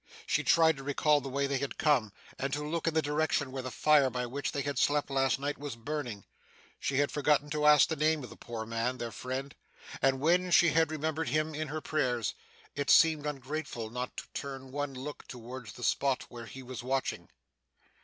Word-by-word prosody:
She - - +1
tried 160 -2 +5
to 135 - -8
recall 145 +1 +2
the 135 - -6
way 140 +1 0
they 140 -1 0
had 140 0 -4
come, 130 -9 +2 0.3
and 135 +1 -1
to 150 +1 -2
look 165 +1 -2
in 165 - +1
the 160 - +3
direction 145 -2 0
where 130 0 -4
the 130 - -5
fire 145 0 +4
by 125 -1 -2
which 140 +4 -3
they 140 - -2
had 140 -2 -2
slept 145 -1 +2
last 135 -1 +2
night 145 +1 -3
was 145 -4 -5
burning. 120 -4 -5 0.5
She 135 - -1
had 145 0 +2
forgotten 145 0 +2
to 150 0 +2
ask 150 -1 +7
the 160 - -2
name 155 -1 +1
of 125 - -9
the - - -10
poor 115 -2 -6
man, 115 +3 -1
their 120 -2 -4
friend, 130 +3 -5 0.5
and 135 0 +3
when 175 +5 +3
she 170 -1 +6
had 160 +1 +3
remembered 155 -1 -2
him 155 +3 0
in 155 +1 -3
her 155 +2 -4
prayers, 125 -9 0 0.4
it 145 -1 -3
seemed 155 -2 +5
ungrateful 135 -5 -4
not 125 +1 -5
to - - -4
turn 135 -2 -6
one 145 -1 -3
look 145 +3 -7
towards 125 -2 -8
the 125 - -10
spot 135 +1 +1
where 115 -1 -9
he 130 +2 -9
was 130 0 -7
watching. 130 +2 -2
140 Hz, 215 wpm, -31 LUFS, 130-150 Hz, 0.5 s, ask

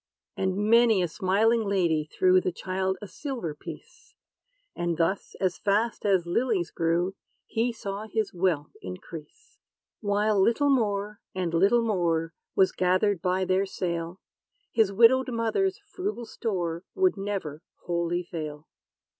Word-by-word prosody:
And 190 0 -1
many 220 -1 +4
a - - +1
smiling 215 +6 +2
lady 175 -7 +1
threw 185 0 +4
The 180 - -1
child 190 +1 -2
a - - -6
silver 245 - -5
piece; 145 - -12 0.6
And 175 -1 -1
thus, 170 +4 -1
as 185 -2 0
fast 210 +2 0
as 190 -4 +3
lilies 190 -1 0
grew, 170 +3 0 0.3
He 230 +2 0
saw 210 -2 -6
his 220 0 -2
wealth 170 -5 0
increase. 150 - -10 0.4
While 205 -1 +2
little 280 +8 +3
more 210 -4 0 0.2
and 180 -3 -2
little 200 +8 +4
more, 170 -6 0 0.2
Was 190 - +4
gathered 185 +1 +1
by 185 0 +1
their 190 +2 +1
sale, 170 -1 -3 0.5
His 220 -4 +3
widowed 240 +6 +5
mother's 235 - 0
frugal 370 - -4
store 175 -7 -3
Would 375 -1 +3
never 195 -7 -4 0.2
wholly 175 0 -1
fail. 155 -3 -6
190 Hz, 135 wpm, -27 LUFS, 175-220 Hz, 0.6 s, widowed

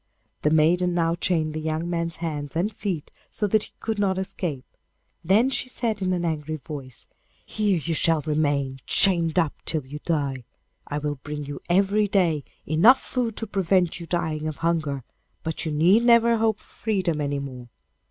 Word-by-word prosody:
The 150 - +3
maiden 175 +3 +3
now 165 -1 +2
chained 165 -3 0
the 155 - -3
young 160 +2 -2
man's 170 -1 -2
hands 150 -3 -4
and 195 +6 0
feet 180 -7 -4 0.2
so 210 - -1
that 215 +1 +3
he - - -19
could 220 -2 -3
not 190 -2 +1
escape; 175 -7 -3 0.6
then 210 +10 +4
she 255 - -1
said 225 -5 -1
in 185 -1 +1
an 175 -1 0
angry 155 -1 -2
voice, 135 -4 -6 0.4
'Here 210 -3 +1
you 165 +1 -2
shall 160 0 +2
remain 145 -3 0
chained 170 -4 +3
up 165 -5 +3
until 155 -4 -1
you 145 +3 -7
die. 140 -6 -1 0.4
I 145 - -3
will 145 -1 -2
bring 150 +1 -5
you 145 0 -7
every 200 +3 +3
day 170 -7 +2 0.2
enough 200 - +6
food 240 -4 -2
to 225 - -3
prevent 185 -4 +1
you 170 - -8
dying 160 -3 -1
of 155 - -3
hunger, 155 -6 0 0.4
but 160 0 -3
you - - -1
need 175 +10 +4
never 235 -1 +5
hope 220 -1 +2
for - - -22
freedom 185 -8 -1
any 145 0 -1
more. 130 -3 -7
165 Hz, 180 wpm, -25 LUFS, 150-195 Hz, 0.6 s, enough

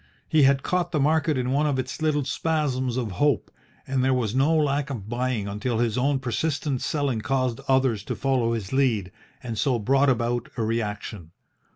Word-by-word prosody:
He 155 - +3
had 135 0 +4
caught 180 -1 0
the 155 - 0
market 155 +1 +2
in 125 0 -1
one 145 +3 +2
of 140 -3 0
its 130 +4 -4
little 150 -3 +1
spasms 135 -5 -1
of 120 -5 -2
hope, 145 +9 +1 0.3
and 135 -1 0
there 130 0 +3
was 115 -4 -1
no 135 +5 +3
lack 145 -1 +1
of 110 -8 -5
buying 120 -3 -1
until 105 +4 -2
his 115 -2 +1
own 135 +2 +2
persistent 140 +1 -2
selling 140 -7 -1
caused 130 0 -1
others 130 -6 +2
to - - -3
follow 130 -4 +1
his 110 -2 -4
lead, 115 -9 +1 0.3
and 115 -3 -4
so 130 -4 +2
brought 135 +5 +3
about 120 -1 0
a 115 - 0
reaction. 105 -6 -3
130 Hz, 190 wpm, -25 LUFS, 115-140 Hz, 0.3 s, had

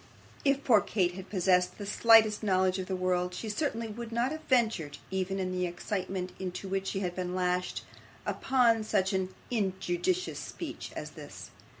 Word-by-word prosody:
If 275 0 +2
poor 220 -5 +6
Kate 180 -4 0
had 190 +1 -9
possessed 180 -2 +2
the 205 - -6
slightest 220 0 +5
knowledge 185 -2 +2
of 185 - -4
the 190 - -1
world, 180 -1 0
she 220 - -4
certainly 230 -1 -1
would 230 +2 -7
not 235 +3 +1
have 310 0 -5
ventured, 220 - +2
even 190 0 -1
in 185 -1 -1
the 180 0 0
excitement 185 +1 -3
into 185 +1 -4
which 195 0 -2
she 195 - -2
had 180 -2 -2
been 180 -1 -3
lashed, 180 0 0 0.4
upon 235 -4 +3
such 200 -2 +1
an 190 -1 0 0.2
injudicious 200 - 0
speech - - -6
as - - -5
this. - - -10
190 Hz, 175 wpm, -30 LUFS, 185-225 Hz, 0.4 s, poor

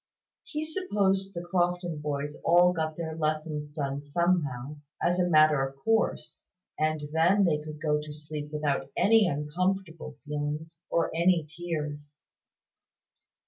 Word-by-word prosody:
He 310 -10 -4
supposed 200 - 0
the 170 - -4
Crofton 175 -2 0
boys 145 0 -3
all 175 +1 +5
got 160 -2 -2
their 160 -2 -4
lessons 155 -1 -2
done 140 -2 -3
somehow, 145 -3 0 0.2
as 175 +1 +1
a 180 0 +2
matter 155 -3 +5
of 135 0 -4
course; 225 +11 -1 0.3
and 155 -1 0
then 180 +5 +4
they 155 -4 +2
could 150 0 -8
go 150 -1 +1
to 150 0 -8
sleep 150 0 -6
without 150 -3 -1
any 220 -1 +5
uncomfortable 165 +1 -2
feelings 150 +2 -4
or 165 -1 0
any 170 -1 +3
tears. 150 -3 -5
155 Hz, 135 wpm, -28 LUFS, 150-175 Hz, 0.3 s, all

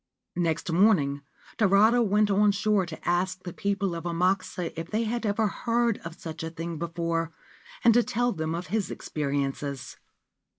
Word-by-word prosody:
Next 165 -1 0
morning 165 -7 +3 0.4
Tarada 215 +3 +5
went 210 -1 +3
on 205 +1 +4
shore 205 -2 +1
to 160 - -9
ask 180 +1 0
the 175 - -6
people 200 -2 -1
of 165 -1 -5
Amakusa 180 0 0
if 165 0 -5
they 220 +2 0
had 230 0 -2
ever 210 +2 +1
heard 235 +1 0
of 165 0 -8
such 160 -2 -7
a 160 - -3
thing 165 0 -5
before, 165 -1 -2 0.5
and 235 - +7
to 240 - +5
tell 245 +2 0
them 160 -3 -2
of 175 +2 -4
his 220 -3 0
experiences. 140 -2 -3
180 Hz, 165 wpm, -27 LUFS, 165-210 Hz, 0.5 s, and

